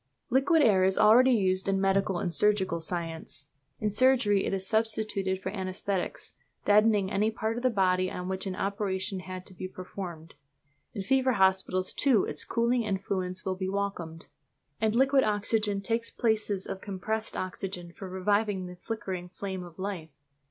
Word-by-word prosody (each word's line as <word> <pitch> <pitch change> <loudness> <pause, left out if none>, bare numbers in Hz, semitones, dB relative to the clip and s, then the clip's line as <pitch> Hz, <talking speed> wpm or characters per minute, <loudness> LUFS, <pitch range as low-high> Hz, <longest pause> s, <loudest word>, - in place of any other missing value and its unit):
Liquid 285 +5 +4
air 195 -6 +5
is 190 0 +2
already 230 +5 +6
used 190 -6 +2
in 195 0 +1
medical 195 -1 +1
and 175 -1 -2
surgical 190 -1 +2
science. 165 -1 -4 0.3
In 215 - 0
surgery 210 -2 +3
it - - -1
is 190 -1 -2
substituted 215 -3 0
for 190 0 -4
anæsthetics, 190 -1 -3 0.3
deadening 210 -2 +4
any 210 +2 +2
part 220 0 -2
of 240 - -4
the 255 - +3
body 185 -4 +2
on 180 0 -5
which 190 +1 -3
an 185 - -3
operation 195 -1 -2
has 185 0 -7
to 185 - -11
be 185 +1 -6
performed. 180 -3 -8 0.6
In 200 - -3
fever 260 +4 +2
hospitals, 190 -2 +2
too, 255 -9 +3
its 150 - -3
cooling 235 +1 +1
influence 190 -3 -2
will 190 - 0
be 185 0 -3
welcomed; 190 -5 -3 0.5
and 220 0 +1
liquid 270 +1 +4
oxygen 210 -1 +1
takes 230 +3 -2
the - - -28
places 215 -4 0
of 190 - -6
compressed 215 +3 -3
oxygen 185 -2 -5
for 190 +1 -8
reviving 200 +1 0
the 180 0 -9
flickering 190 -4 -5
flame 190 0 -5
of 175 -2 -12
life. 190 -4 -4
195 Hz, 165 wpm, -29 LUFS, 185-215 Hz, 0.6 s, already